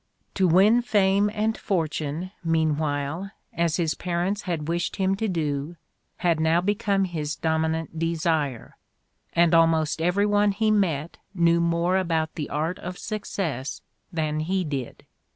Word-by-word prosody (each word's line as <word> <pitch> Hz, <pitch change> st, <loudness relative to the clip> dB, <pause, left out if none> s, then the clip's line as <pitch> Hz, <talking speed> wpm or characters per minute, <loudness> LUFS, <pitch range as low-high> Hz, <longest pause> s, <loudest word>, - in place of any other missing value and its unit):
To 190 Hz, -2 st, +2 dB
win 200 Hz, +8 st, +5 dB
fame 200 Hz, -3 st, +3 dB
and 220 Hz, +1 st, 0 dB
fortune, 160 Hz, -1 st, -2 dB
meanwhile, 155 Hz, +1 st, 0 dB, 0.2 s
as 170 Hz, -1 st, +1 dB
his 165 Hz, -3 st, +1 dB
parents 180 Hz, +3 st, -2 dB
had 165 Hz, -5 st, -3 dB
wished 170 Hz, +1 st, -1 dB
him 190 Hz, -1 st, +1 dB
to 220 Hz, -, -1 dB
do, 155 Hz, -3 st, -2 dB, 0.4 s
had 170 Hz, -3 st, +1 dB
now 160 Hz, +2 st, +3 dB
become 200 Hz, +1 st, +1 dB
his 155 Hz, -5 st, -3 dB
dominant 160 Hz, 0 st, -1 dB
desire, 160 Hz, -6 st, -1 dB, 0.6 s
and 170 Hz, 0 st, +4 dB
almost 160 Hz, -1 st, +3 dB
every 180 Hz, +5 st, +2 dB
one 205 Hz, 0 st, +3 dB
he 215 Hz, +1 st, +1 dB
met 170 Hz, -7 st, 0 dB, 0.2 s
knew 170 Hz, -1 st, +3 dB
more 170 Hz, +2 st, +1 dB
about 165 Hz, -4 st, 0 dB
the 150 Hz, -, -5 dB
art 160 Hz, +5 st, -2 dB
of 180 Hz, 0 st, -6 dB
success 185 Hz, -, -4 dB, 0.3 s
than 155 Hz, -3 st, -1 dB
he 185 Hz, +4 st, 0 dB
did. 140 Hz, -6 st, -5 dB
170 Hz, 140 wpm, -25 LUFS, 160-190 Hz, 0.6 s, win